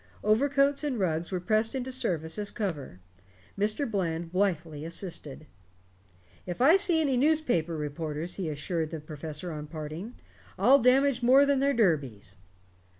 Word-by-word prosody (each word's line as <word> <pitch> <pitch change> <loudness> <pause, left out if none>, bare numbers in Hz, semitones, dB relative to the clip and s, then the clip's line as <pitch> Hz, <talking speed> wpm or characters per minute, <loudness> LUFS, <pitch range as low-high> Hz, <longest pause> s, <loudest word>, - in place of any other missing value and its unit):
Overcoats 275 +6 +2
and 285 -4 -1
rugs 170 -2 -1
were 185 - -1
pressed 215 +6 0
into 260 0 -3
service 165 - -2
as 205 -1 -3
cover. 155 - -5 0.6
Mr. 210 +8 +1
Bland 170 -6 -2
blithely 170 -6 -1
assisted. 165 -3 -6 1.0
"If 175 - -5
I 285 +8 +6
see 385 -4 +3
any 275 -5 +1
newspaper 245 - +1
reporters," 155 +2 -4
he 185 -5 -3
assured 160 +2 -3
the 160 -1 -6
professor 155 +3 -7
on 150 -1 -6
parting, 160 +8 -7 0.4
"I'll 255 +9 +6
damage 260 +1 +3
more 260 +4 +6
than 280 -1 +2
their 280 +1 +2
derbies." 135 - 0
185 Hz, 145 wpm, -28 LUFS, 155-255 Hz, 1.0 s, I